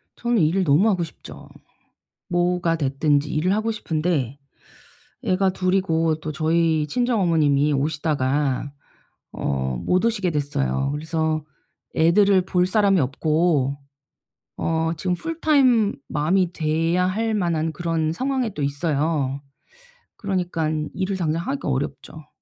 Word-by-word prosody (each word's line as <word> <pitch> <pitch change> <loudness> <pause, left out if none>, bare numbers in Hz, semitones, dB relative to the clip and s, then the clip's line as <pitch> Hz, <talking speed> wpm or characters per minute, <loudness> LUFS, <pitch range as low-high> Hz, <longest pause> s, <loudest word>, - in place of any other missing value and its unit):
저는 240 -1 0
일을 170 +5 +2
너무 175 +7 +4
하고 180 -4 +1
싶죠. 165 - -11 0.8
뭐가 175 -1 +1
됐든지 145 0 +1
일을 175 +5 +1
하고 220 +2 0
싶은데 155 - -2 0.9
애가 190 +1 +2
2 185 0 0
이고 165 -4 +1
또 155 0 -5
저희 160 0 +1
친정 240 - 0
어머님이 150 -4 +2
오시다가 145 -2 0 0.6
어 65 -1 -2
못 185 +4 +1
오시게 205 -6 +1
됐어요. 140 -2 -1
그래서 160 0 -1 0.5
애들을 185 +3 +4
볼 180 -1 +2
사람이 195 -1 +3
없고 145 0 +1 0.8
어 160 0 0
지금 180 +2 -1
풀타임 275 - +2
맘이 175 +4 +1
돼야 165 +3 +1
할 220 +4 -1
만한 165 -5 0
그런 165 -1 -1
상황에 255 +1 -1
또 150 - -3
있어요. 140 -1 -1 0.8
그러니깐 165 -6 -2
일을 190 +1 -2
당장 165 -2 -1
하기가 275 - -3
어렵죠. 145 +3 -4
165 Hz, 255 characters per minute, -23 LUFS, 150-185 Hz, 0.9 s, 너무